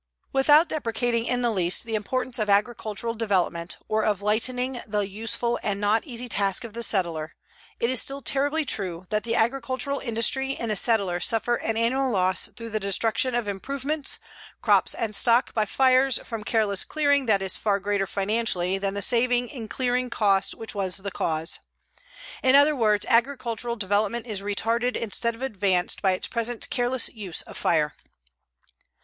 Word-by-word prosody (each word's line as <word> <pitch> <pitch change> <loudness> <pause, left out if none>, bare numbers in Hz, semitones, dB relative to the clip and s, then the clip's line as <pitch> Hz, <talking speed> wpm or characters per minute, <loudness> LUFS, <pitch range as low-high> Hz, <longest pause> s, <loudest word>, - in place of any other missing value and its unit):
Without 295 +5 +5
deprecating 235 -4 -1
in 245 -1 0
the 240 - +2
least 180 -4 +1
the 225 - -7
importance 250 +4 -2
of 210 -1 -1
agricultural 215 +1 0
development 185 -6 -1
or 215 0 0
of 210 -3 +1
lightening 245 +4 0
the 205 -1 -1
useful 230 +4 -2
and 200 -1 -2
not 210 +2 +2
easy 245 -1 -4
task 200 -3 0
of 230 -3 -9
the 235 - -5
settler, 170 -8 0 0.4
it 235 - +1
is 255 -1 +4
still 275 +1 -4
terribly 290 +3 0
true 185 -7 -2
that 210 0 0
the 230 0 -1
agricultural 270 +3 0
industry 265 +3 0
and 230 -2 -3
the - - 0
settler 200 -5 +2
suffer 225 +5 +1
an 225 0 -2
annual 260 +4 +1
loss 185 -5 +2
through 230 -1 -9
the 215 - -1
destruction 225 +5 0
of 240 -3 -1
improvements, 275 +8 -2 0.4
crops - - +3
and 220 -3 -2
stock 235 +3 +3
by 215 -2 +1
fires 260 +3 +3
from 225 -3 -6
careless 210 -3 +2
clearing 285 -3 +1
that 200 -3 +2
is 190 - +1
far 200 -2 0
greater 200 0 -1
financially 195 -2 0
than 195 0 -2
the 200 - 0
saving 245 0 +2
in 230 -5 -7
clearing 250 +2 -1
cost 200 -4 +1
which 225 - -6
was 195 -3 -1
the 200 0 -4
cause. 160 -1 -1 0.8
In 260 +1 +4
other 290 +2 +6
words, 215 -5 +2
agricultural 235 -1 0
development 210 +2 -1
is 210 -5 -2
retarded 230 +5 -1
instead 230 +2 -1
of 240 - -9
advanced 195 -7 +1
by 190 -1 +3
its 185 - -3
present 235 -1 -3
careless 245 0 +1
use 195 -7 -6
of - - -12
fire. 150 -4 +1
225 Hz, 170 wpm, -25 LUFS, 200-245 Hz, 0.8 s, other